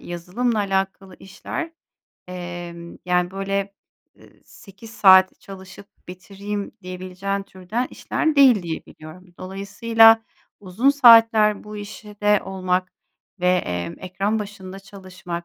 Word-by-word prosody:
yazılımla 185 +7 -3
alakalı 195 -1 -2
işler, 325 - -7 0.6
emm, 175 -1 -8
yani, 180 0 0
böyle, 195 +1 -3 0.5
ııı, - - -18 0.2
8 200 +3 -15
saat 190 -3 +5
çalışıp 195 +1 -12 0.2
bitireyim, 200 +3 -7
diyebileceğin 185 +2 -5
türden 195 +7 -5
işler 315 -2 -2
değil 250 -8 +6
diye 165 -2 -6
biliyorum. 175 +3 -14
Dolayısıyla, 225 +4 +3 0.4
uzun 205 +8 +1
saatler 225 -6 +5
bu 210 0 -9
işte 210 0 -2
olmak 185 -1 -2 0.5
ve, 180 - +2
emm, 90 - -1
ekran 195 +4 -2
başında 195 -2 -8
çalışmak 185 -3 -9
195 Hz, 110 wpm, -22 LUFS, 180-210 Hz, 0.6 s, değil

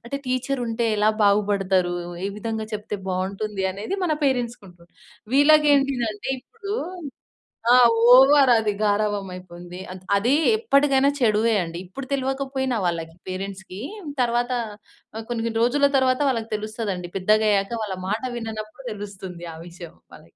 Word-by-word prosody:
అంటే, 240 +4 -4
టీచరుంటే 255 -2 -1
ఎలా 210 +1 +3 0.2
బాగుపడతారు, 195 -3 +2 0.3
ఏ - - +1
విధంగా 220 0 -3
చెప్తే 210 0 -4
బావుంటుంది, 195 +2 -3
అనేది 205 - -4
మన 330 - +1
పేరెంట్స్‌కుంటుంది. 230 -10 -3 0.4
వీళ్ళకేంటిదంటే 275 -7 +3
ఇప్పుడూ 410 - -7 1.0
ఆ! - - +8 0.4
ఓవర్ 270 +1 +7
అది 220 -2 +1
గారాబమయిపోయింది. 185 -4 -2
అత్ 185 - -9 0.2
అదీ 230 +6 +2 0.2
ఎప్పడికైనా 280 - +3
చెడువే 225 -2 +2
అండి. 170 0 -7
ఇప్పుడు 260 +9 -8
తెలవకపోయినా 265 -1 -1
వాళ్ళకి 165 -1 -3
పేరెంట్స్‌కీ, 190 0 -6 0.4
తర్వాత 240 +1 0 0.6
ఆహ్, 225 - -5
కొన్ని 235 -2 -2
కొన్ని 225 -1 -2
రోజుల 280 +4 +3
తరువాత 255 0 +2
వాళ్ళకి 230 -3 -3
తెలుస్తదండి. 210 -4 -5
పెద్దగయ్యాక 210 0 +2
వాళ్ళ 195 -3 -4
మాట 210 +3 -1
విననప్పుడు 220 +2 -7
తెలుస్తుంది 190 -4 -8
ఆ - - -10
విషయం 170 -1 -11 0.2
వాళ్ళకి. - - -16
215 Hz, 125 wpm, -23 LUFS, 195-255 Hz, 1.0 s, ఆ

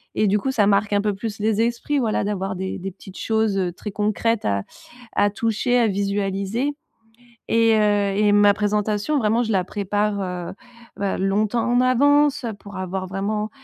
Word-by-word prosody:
et 215 - +2
du 200 +2 +3
coup 265 +6 -1
ça 210 -6 +2
marque 205 +1 +2
un 205 - +3
peu 210 0 0
plus 215 +1 -5
les 215 0 0
esprits, 240 +5 -1
voilà. 225 -4 0
D'avoir 195 -2 -2
des 190 +1 -4
des 195 +1 -5
petites 190 0 -13
choses, 220 -2 0
heu, 185 -2 0
très 195 +4 -7
concrètes 215 +2 0
à 100 -1 0 0.5
à 205 - +3
toucher, 230 +3 0
à 235 - +4
visualiser, 200 +5 -1 0.8
et 230 0 +4
heu 205 -2 +2
et 210 0 +3
ma 205 0 +5
présentation. 210 +6 0
Vraiment 225 0 +2
je 225 - -3
la 190 -2 +1
prépare, 205 +1 -1
heu, 180 -2 -4 0.4
bah, 200 -1 -2
longtemps 210 +4 0
en 245 0 +3
avance, 285 +2 +3
heu, 230 - -2
pour 200 0 -12
avoir 185 0 -4
vraiment, 210 +3 -2
205 Hz, 185 wpm, -22 LUFS, 195-225 Hz, 0.8 s, ma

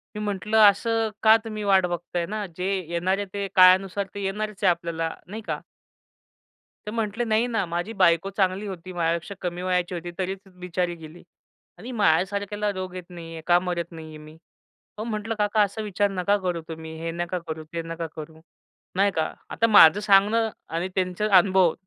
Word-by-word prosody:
मी - - -4
म्हंटलं, 210 +2 -1
असं 225 +2 0
का 220 0 +8
तुम्ही 215 -2 -5
वाट 195 -2 +4
बघत 175 0 -5
आहे 175 -1 +1
ना, 210 +3 -4
जे 180 - -3 0.2
येणारे 185 +4 0
ते 200 -1 -2
काळानुसार 190 +2 +5
ते 205 - -4
येणारच 210 +1 -3
आहे - - +6
आपल्याला 170 -1 -1 0.2
नाही 215 +4 -7
का? - - -2 1.3
ते 210 - -5
म्हटले, 225 0 -2
"नाही 225 +2 +2
ना 225 -5 0
माझी 175 +6 -3
बायको 170 +2 +4
चांगली 195 0 0
होती 185 -1 -7
माझ्यापेक्षा 170 +3 -1
कमी 175 0 -3
वयाची 180 -1 0
होती 175 0 -5
तरीच 190 0 -3 0.2
बिचारी 180 -1 -1
गेली 160 +1 -12 0.5
आणि 230 +8 -8
माझ्यासारख्याला 200 +4 +1
रोग 185 -1 -5
येत 180 - -6
नाही 170 -2 -9
आहे, 165 - -7
का 175 0 +5
मरत 175 -2 -3
नाही 160 -1 -9
आहे 155 -1 -10
मी." 155 +1 -13 0.6
पण 215 +2 -4
म्हटलं, 220 0 -3
"काका 210 +1 +2
असा 205 +2 0
विचार 205 -1 0
नका 195 +2 +1
करू 175 -2 -1
तुम्ही 160 0 -8
हे 165 0 -3
नका 175 +2 -3
करू, 160 0 -5
ते 170 - -2
नका 165 0 -5
करू. 160 0 -9 0.6
नाही 200 +2 +3
का?" 160 -1 -1 0.2
आता 230 - +1
माझं 200 -4 +8
सांगणं 210 +2 +4 0.2
आणि 165 +3 -2
त्यांचे 185 +2 0
अनुभव 190 -3 +5
185 Hz, 185 wpm, -25 LUFS, 170-205 Hz, 1.3 s, का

